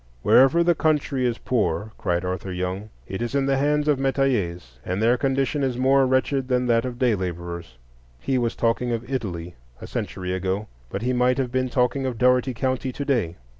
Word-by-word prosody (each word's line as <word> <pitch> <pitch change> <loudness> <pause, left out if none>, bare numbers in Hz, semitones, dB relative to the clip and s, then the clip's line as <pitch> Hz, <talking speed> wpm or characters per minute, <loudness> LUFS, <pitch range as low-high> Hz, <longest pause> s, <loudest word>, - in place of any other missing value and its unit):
"Wherever 135 +7 +5
the 175 0 +4
country 150 -5 +1
is 120 -1 -1
poor," 105 -3 -1
cried 90 -2 -1
Arthur 95 +1 -3
Young, 90 +3 -3 0.2
"it 95 - -5
is 120 +3 -2
in 140 -1 +2
the 135 0 +2
hands 150 +2 +1
of 145 -3 +3
metayers," 105 - -1
and 90 +5 -2
"their 115 +3 +4
condition 135 +2 0
is 130 -3 0
more 135 +1 +4
wretched 130 +1 +1
than 125 -1 +1
that 115 0 +2
of 125 -1 -5
day 125 -2 +3
laborers." 85 - -5 0.4
He 130 - 0
was 120 -1 -1
talking 120 +1 0
of 115 +1 -4
Italy 90 -10 -4 0.3
a - - -8
century 90 -1 -4
ago; 95 +3 -2 0.2
but - - -4
he 125 +1 +1
might 125 +1 +2
have 130 -3 -1
been 130 0 0
talking 130 +2 +1
of 125 -3 -3
Dougherty 125 +1 +3
County 130 +1 -1
to 140 - -5
day. 115 - 0
125 Hz, 200 wpm, -24 LUFS, 95-135 Hz, 0.4 s, Wherever